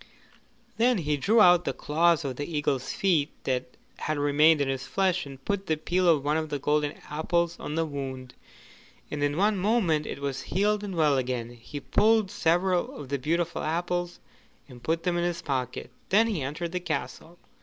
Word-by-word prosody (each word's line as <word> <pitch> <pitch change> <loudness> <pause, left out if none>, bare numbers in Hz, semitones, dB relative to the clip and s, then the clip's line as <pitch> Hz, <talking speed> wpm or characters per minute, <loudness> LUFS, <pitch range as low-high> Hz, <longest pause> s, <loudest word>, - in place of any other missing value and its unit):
Then 240 +1 +3
he 150 -4 0
drew 215 +10 +3
out 175 -3 +6
the - - -2
claws 165 +1 +2
of 130 -2 -3
the 145 +5 -5
eagle's 135 -3 -1
feet 175 -7 +1
that 125 -1 -3 0.2
had 155 -1 -2
remained 150 +2 +4
in 140 - +1
his 135 -1 -3
flesh, 185 -5 0
and 135 -1 -12
put 200 -2 -2
the 155 - +2
peel 180 +3 +1
of 150 -4 +3
one 150 +2 +2
of 155 -1 -3
the 145 - -2
golden 150 +1 0 0.2
apples 170 +3 0
on 150 - -5
the 165 0 +1
wound, 130 -4 -6 0.8
and 150 - -3
in 145 +1 0
one 205 +2 +2
moment 185 -7 +1
it - - -5
was 140 -1 -3
healed 205 +7 0
and 195 -3 -5
well 150 -4 +3
again. 125 -2 -3
He 120 +4 -9
pulled 215 +6 +2
several 175 +2 +1
of 140 -3 -9
the 140 0 -1
beautiful 170 +5 -1
apples 175 +2 -2 0.5
and 125 -3 -13
put 165 +4 -1
them 180 -1 0
in - - 0
his 175 -1 -2
pocket; 130 -3 -3 0.2
then 215 +4 +5
he 210 -9 -2
entered 150 +6 -4
the 180 - -2
castle. 160 0 -5
160 Hz, 195 wpm, -27 LUFS, 140-180 Hz, 0.8 s, out